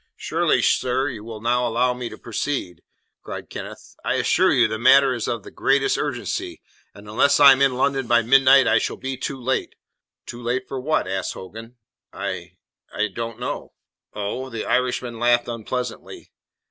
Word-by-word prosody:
"Surely, - - +1
sir, 130 +2 +1
you 110 -5 -8
will 110 -1 -8
now 120 +1 +1
allow 125 +2 +1
me 125 -1 -5
to - - -10
proceed," 115 - -4 0.4
cried - - -8
Kenneth. - - -9
"I - - 0
assure - - +3
you 120 -2 +4
the 110 0 -4
matter 135 +2 +5
is 120 -3 -3
of 115 -4 -3
the - - -11
greatest 135 0 +1
urgency, - - -3 0.4
and 100 +1 -13
unless 140 +7 +3
I 140 -1 +10
am 135 0 +3
in 135 -2 +3
London 135 -1 0
by 120 0 +4
midnight 135 +1 +6
I - - +4
shall - - -3
be 135 0 -4
too 135 +1 -5
late." 130 +1 -2 0.5
"Too 120 - -8
late 125 +2 -2
for 135 - -5
what?" 155 -4 0
asked 95 0 -3
Hogan. 115 +6 -10 0.4
"I - - -5 0.4
I 105 0 -1
don't 115 +3 -6
know." - - -5 0.4
"Oh?" 105 +6 -4
The 115 -3 -5
Irishman 125 -2 -1
laughed 120 0 +3
unpleasantly. 120 +1 -6
125 Hz, 175 wpm, -22 LUFS, 115-130 Hz, 0.5 s, I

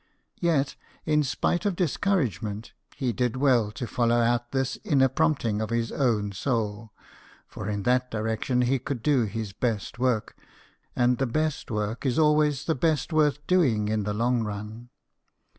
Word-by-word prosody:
Yet, 155 -6 +1 0.3
in 150 -1 +3
spite 150 +5 0
of 200 -3 0
discouragement, 125 - -1 0.2
he 125 -3 -1
did 125 -1 0
well 130 -5 +3
to 120 - -4
follow 120 0 +1
out 120 0 +1
this 135 -1 -1
inner 135 -2 +4
prompting 130 -7 0
of 110 - -2
his 115 -1 -1
own 110 -7 0
soul; 110 0 -2 0.5
for 100 - -7
in 100 -1 -2
that 125 +2 +2
direction 110 +3 -1
he 130 +2 +1
could 125 -2 -5
do 135 -6 +3
his 105 -1 -5
best 115 -2 -2
work 125 -4 0 0.6
and 125 0 +2
the 135 - +1
best 155 +4 -1
work 105 +1 -2
is 130 -3 0
always 150 -2 +3
the 160 - +1
best 155 +2 0
worth 150 -2 +2
doing 125 - +2
in 110 0 0
the 105 +1 -2
long 120 +2 +1
run. 105 +3 -6
125 Hz, 160 wpm, -26 LUFS, 110-145 Hz, 0.6 s, inner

